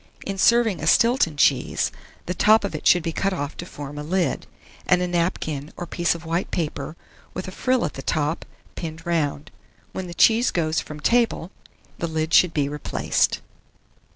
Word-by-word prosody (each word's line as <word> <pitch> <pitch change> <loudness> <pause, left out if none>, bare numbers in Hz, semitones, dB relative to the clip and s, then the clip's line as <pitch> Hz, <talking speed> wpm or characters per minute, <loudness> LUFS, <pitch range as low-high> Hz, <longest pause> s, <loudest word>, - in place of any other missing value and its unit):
In 195 -1 -4
serving 235 -2 +4
a - - -2
Stilton 230 - +3
cheese, 140 -2 +2 0.3
the 180 - -2
top 215 +4 +5
of 200 - -3
it - - -2
should 175 -2 +5
be 165 - -1
cut 195 +4 -1
off 145 -5 -4
to 175 - -6
form 145 -2 -8
a - - -5
lid, 180 +4 -1 0.4
and 180 - +4
a 180 - 0
napkin 165 -4 -2
or 175 - -4
piece 170 0 0
of 170 0 -9
white 170 +3 -1
paper, 150 -2 -3 0.4
with 185 - -4
a - - -5
frill 255 +5 +1
at - - -4
the 135 - -7
top, 150 +3 -1 0.3
pinned 165 -1 -7
round. 155 -3 -1 0.4
When 190 -1 -5
the 170 - -8
cheese 230 +5 +5
goes 160 -1 0
from 150 -1 -8
table, 230 -4 +1 0.5
the 170 - -1
lid 160 0 -2
should 180 - +6
be 145 -3 0
replaced. 145 0 0
170 Hz, 185 wpm, -23 LUFS, 155-185 Hz, 0.5 s, should